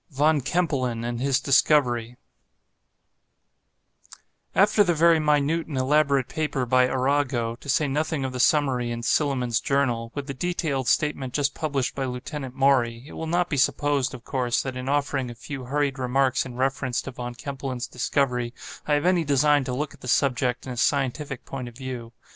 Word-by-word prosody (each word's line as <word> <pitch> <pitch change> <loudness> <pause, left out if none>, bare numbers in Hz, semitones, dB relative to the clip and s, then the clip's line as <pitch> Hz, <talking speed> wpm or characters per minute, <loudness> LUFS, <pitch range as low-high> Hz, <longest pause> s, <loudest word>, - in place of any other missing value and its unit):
VON 150 +1 +2
KEMPELEN 130 -6 -1
AND 120 0 -3
HIS 135 -1 +2
DISCOVERY 125 -4 +2 2.4
After 205 +1 +5
the 175 -3 +1
very 165 +1 +5
minute 150 +2 +1
and 145 -4 -4
elaborate 140 0 +2
paper 150 -5 -2
by 125 +1 +4
Arago, 130 -3 0
to 140 - -11
say 150 +2 +2
nothing 150 0 -1
of 130 - -4
the 125 - -4
summary 130 -3 +2
in 120 0 -4
'Silliman's 125 -5 +1
Journal,' 120 -5 0
with 145 -1 -4
the 140 - -5
detailed 150 -4 -2
statement 130 +1 0
just 140 -1 +1
published 140 -5 -2
by 135 - -2
Lieutenant 130 +1 -6
Maury, 130 -4 +2
it - - -12
will 160 - -5
not 175 +2 +1
be 145 - -2
supposed, 140 -1 +1
of 120 - -12
course, 125 -3 -1
that 130 -1 -5
in 125 +1 -4
offering 140 -2 0
a 120 - -8
few 135 +2 -7
hurried 140 +1 -1
remarks 130 +1 +1
in 125 - -9
reference 130 -1 -1
to 135 - -6
Von 120 -1 -6
Kempelen's 130 -1 -5
discovery, 125 -1 -1 0.3
I 150 - +2
have 145 - 0
any 180 -2 +3
design 145 0 +3
to 125 - -3
look 145 +2 -3
at - - -18
the - - -8
subject 125 -1 +1
in 130 - -5
a - - -9
scientific 140 +1 -1
point 130 -2 -6
of 120 -1 -11
view. 125 -3 -6
135 Hz, 180 wpm, -25 LUFS, 125-145 Hz, 2.4 s, After